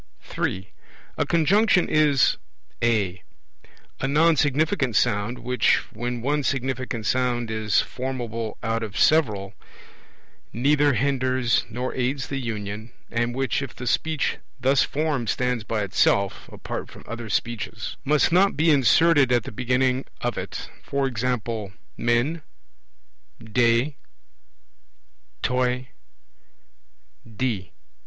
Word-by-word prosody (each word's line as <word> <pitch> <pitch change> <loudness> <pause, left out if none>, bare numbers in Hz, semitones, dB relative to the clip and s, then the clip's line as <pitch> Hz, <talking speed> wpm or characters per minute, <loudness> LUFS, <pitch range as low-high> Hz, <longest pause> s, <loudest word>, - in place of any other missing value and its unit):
(3) 95 +1 -3 0.4
A - - -1
Conjunction 180 +3 +3
is 150 -4 +3 0.5
(a) 100 -6 +1 0.8
a 135 - -1
non 160 +4 +4
significant 145 - +1
sound 115 +1 +1
which, 125 0 +2 0.2
when 120 +1 -4
one 145 +3 +1
significant 130 -4 -2
sound 120 -2 0
is 110 -2 +2
formable 120 -4 -4
out 115 +1 -1
of 105 -3 -5
several, 105 -11 +2 1.0
neither 145 +5 +3
hinders 130 -1 +1
nor 125 +3 -3
aids 130 +1 -2
the 135 - -2
union, 110 -1 -5 0.2
and 120 +1 -1
which, 135 0 0
if 135 -4 -6
the 125 - -7
Speech 155 +4 0 0.2
thus 135 +2 +3
formed 145 -6 -1
stands 125 -3 0
by 105 -1 -2
itself 100 0 +1
(apart - - -6
from - - -13
other 115 0 -6
Speeches) 115 0 -3
must 150 +3 +3
not 185 -1 +4
be 160 +2 +4
inserted 145 +1 +5
at 120 -2 +3
the - - -7
beginning 125 +3 +1 0.2
of - - -2
it; - - -5 0.2
e.g. 120 -5 -1 0.3
men, 120 +8 +1 1.0
de, 120 +5 +2 1.5
toi, 125 0 0 1.5
de. 105 -9 -2
125 Hz, 115 wpm, -24 LUFS, 115-140 Hz, 1.5 s, inserted